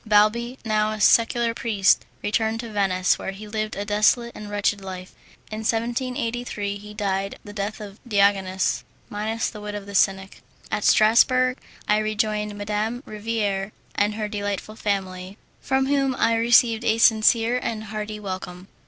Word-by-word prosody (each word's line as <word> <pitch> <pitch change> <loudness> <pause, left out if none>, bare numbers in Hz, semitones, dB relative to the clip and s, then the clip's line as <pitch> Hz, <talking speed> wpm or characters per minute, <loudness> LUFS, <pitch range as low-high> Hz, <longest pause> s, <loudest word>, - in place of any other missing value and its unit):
Balbi, 220 +4 +2
now 215 0 +1
a 215 - -6
secular 230 +2 +4
priest, 210 -5 +2 0.2
returned 220 +1 0
to 230 -2 -8
Venice, 190 -3 +1
where - - -4
he 210 +2 -10
lived 215 0 -3
a 200 - -4
dissolute 215 +3 +2
and 210 -1 -9
wretched 205 0 0
life. 185 -1 -8 0.4
In 215 - -4
1783 230 -2 -2
he 210 +1 -11
died 195 -1 -2
the 205 - -10
death 205 +2 -4
of 205 -1 -9
Diogenes, 195 -3 +2 0.3
minus 220 +2 -2
the 210 - -9
wit 210 0 -5
of 205 -1 -6
the 200 - -9
cynic. 195 0 +1 0.3
At 215 - -1
Strassburg 255 +4 +4 0.3
I 210 0 +3
rejoined 215 -1 -1
Madame 210 +4 -2
Riviere 210 -2 -2 0.2
and 210 +1 +1
her 215 -1 -2
delightful 205 0 -4
family, 190 -2 -3 0.2
from 265 0 +1
whom 275 -1 +1
I 230 - +2
received 230 0 +4
a 225 -1 +2
sincere 230 +2 +4
and 220 -1 -3
hearty 215 0 -5
welcome. 185 -2 -7
215 Hz, 155 wpm, -24 LUFS, 205-225 Hz, 0.4 s, secular